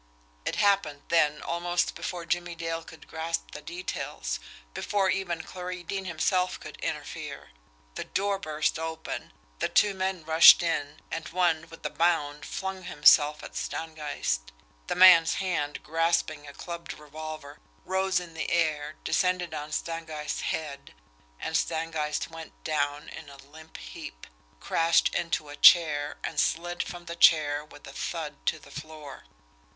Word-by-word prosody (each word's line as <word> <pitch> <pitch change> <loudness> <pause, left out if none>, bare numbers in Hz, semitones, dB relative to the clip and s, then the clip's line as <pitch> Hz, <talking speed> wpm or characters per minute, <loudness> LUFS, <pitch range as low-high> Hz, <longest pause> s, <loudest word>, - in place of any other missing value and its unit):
It - - -1
happened 195 -8 +2
then 150 -3 +3
almost 175 +1 0
before 175 0 -5
Jimmie 175 +1 -1
Dale 165 0 -3
could 160 - -14
grasp 160 +1 -3
the 150 - -8
details; 170 - -4 0.3
before 195 -2 +1
even 175 -3 -2
Clarie 180 -1 -6
Deane 195 +2 -4
himself 180 +2 0
could - - -10
interfere. - - -5 0.4
The - - -5
door 200 0 0
burst 155 -3 -1
open, 160 - -5 0.4
two 205 -1 +5
men 190 -2 -2
rushed 160 +2 +9
in 150 -3 -2
and 165 - -4
one, 170 -2 +1
with 165 -1 -13
a 150 - -1
bound, 150 -4 +1
flung 190 0 -4
himself 150 -1 +5
at - - -9
Stangeist. 150 - -3 0.4
The - - -1
man's 180 -3 +8
hand, 170 -7 -2
grasping 160 -2 0
a 140 - -9
clubbed 170 +1 -7
revolver, 155 -1 -8 0.3
rose 190 0 +1
in 175 -2 -10
the 160 - -3
air, 155 -3 +1
descended 180 -3 +1
on 150 0 -5
Stangeist's 160 -2 -3
head 140 - -4 0.4
and 160 - -3
Stangeist 160 -2 -1
went 165 -1 -9
down 145 -2 -1
in 155 - -9
a 140 - -12
limp 155 +4 -13
heap, - - -9 0.3
crashed 165 0 +3
into 170 -3 -1
the 145 0 -9
chair, 150 -4 +6
and 155 - -2
slid 175 +1 0
from 175 -1 -6
the 170 0 -6
chair 150 -3 +5
with 150 -1 -15
a - - -10
thud 150 -4 -5
to - - +2
the 145 -2 -16
floor. 150 -2 -9
160 Hz, 145 wpm, -28 LUFS, 150-175 Hz, 0.4 s, rushed